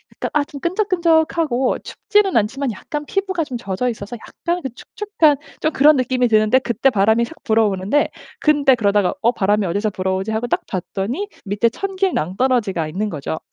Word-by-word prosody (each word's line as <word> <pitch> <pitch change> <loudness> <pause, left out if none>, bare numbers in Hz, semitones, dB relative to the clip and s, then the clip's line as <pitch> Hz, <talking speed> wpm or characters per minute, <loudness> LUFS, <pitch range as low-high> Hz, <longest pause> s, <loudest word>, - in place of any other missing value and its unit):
약간 - - -3
아 295 -1 +2
좀 285 -2 -10
끈적끈적하고 330 - +1
춥지는 410 - +1
않지만 250 +5 0
약간 295 +9 -5
피부가 375 -3 -1
좀 255 -4 -5
젖어 230 +2 -2
있어서 220 0 -6
약간 345 +9 -4
그 265 - -4
축축한 325 - +1 0.2
좀 310 - +1
그런 300 +1 +5
느낌이 255 -1 +1
드는데 215 +3 +4
그때 240 +2 +1
바람이 220 +3 +3
샥 235 - -5
불어오는데 220 +4 +1 0.3
근데 290 -3 +4
그러다가 205 -3 +1
'어 235 - +5
바람이 205 -2 +1
어디서 205 +5 0
불어오지?' 190 +1 -2
하고 220 +2 -1
딱 - - 0
봤더니 200 - -3 0.2
밑에 205 +4 +1
천길 385 +6 -2
낭떨어지가 195 -2 0
있는 205 +7 -2
거죠. 155 0 -4
245 Hz, 395 characters per minute, -20 LUFS, 205-305 Hz, 0.3 s, 그런